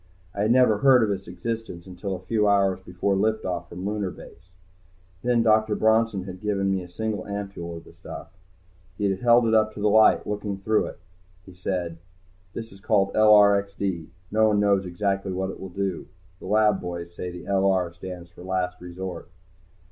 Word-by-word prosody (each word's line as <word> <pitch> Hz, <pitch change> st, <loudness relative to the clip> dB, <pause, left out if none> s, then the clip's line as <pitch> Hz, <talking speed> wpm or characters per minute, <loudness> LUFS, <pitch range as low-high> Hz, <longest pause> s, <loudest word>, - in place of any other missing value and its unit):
I 100 Hz, -, -3 dB
had 105 Hz, +2 st, +2 dB
never 125 Hz, -4 st, +4 dB
heard 130 Hz, -2 st, +6 dB
of 105 Hz, -, +1 dB
its 95 Hz, -1 st, -4 dB
existence 115 Hz, -7 st, -5 dB
until 95 Hz, +1 st, -5 dB
a -, -, -7 dB
few 105 Hz, +1 st, +1 dB
hours 100 Hz, -2 st, +3 dB
before 95 Hz, +1 st, -1 dB
lift 110 Hz, +3 st, 0 dB
off 90 Hz, -2 st, -3 dB
from 90 Hz, +2 st, -7 dB
Lunar 105 Hz, -2 st, -2 dB
Base. 90 Hz, 0 st, -14 dB, 0.7 s
Then 120 Hz, 0 st, +2 dB
Dr. 110 Hz, -1 st, +3 dB
Bronson 110 Hz, -3 st, +2 dB
had 95 Hz, -1 st, -9 dB
given 100 Hz, -2 st, 0 dB
me 95 Hz, -1 st, 0 dB
a 90 Hz, -, -9 dB
single 110 Hz, +3 st, -3 dB
ampule 100 Hz, -4 st, -5 dB
of 80 Hz, -, -11 dB
the -, -, -16 dB
stuff. -, -, -10 dB, 0.7 s
He 100 Hz, -1 st, +1 dB
had 95 Hz, -, -3 dB
held 120 Hz, 0 st, +5 dB
it 110 Hz, -, +1 dB
up 110 Hz, -1 st, +3 dB
to -, -, -7 dB
the 105 Hz, +1 st, +2 dB
light, 110 Hz, +1 st, +5 dB
looking 105 Hz, -1 st, -3 dB
through 110 Hz, +2 st, +1 dB
it. -, -, -9 dB, 0.5 s
He 95 Hz, -, -13 dB
said, 90 Hz, -2 st, -3 dB, 0.6 s
"This 115 Hz, 0 st, -6 dB
is 95 Hz, -, -14 dB
called 100 Hz, -2 st, +2 dB
LRXD. 100 Hz, -4 st, +4 dB, 0.2 s
No 110 Hz, +1 st, +4 dB
one 105 Hz, -1 st, +2 dB
knows 100 Hz, -2 st, +2 dB
exactly 95 Hz, +1 st, -1 dB
what 95 Hz, +1 st, -2 dB
it -, -, -11 dB
will 95 Hz, -, -7 dB
do. 95 Hz, -1 st, -3 dB, 0.3 s
The -, -, -9 dB
lab 105 Hz, -1 st, +3 dB
boys 85 Hz, -1 st, -6 dB
say 90 Hz, +1 st, -5 dB
the 90 Hz, 0 st, -9 dB
'LR' 95 Hz, -3 st, +1 dB
stands 85 Hz, 0 st, -9 dB
for 90 Hz, -, -14 dB
Last 90 Hz, -1 st, -2 dB
Resort." 90 Hz, -1 st, -7 dB
100 Hz, 195 wpm, -25 LUFS, 90-105 Hz, 0.7 s, heard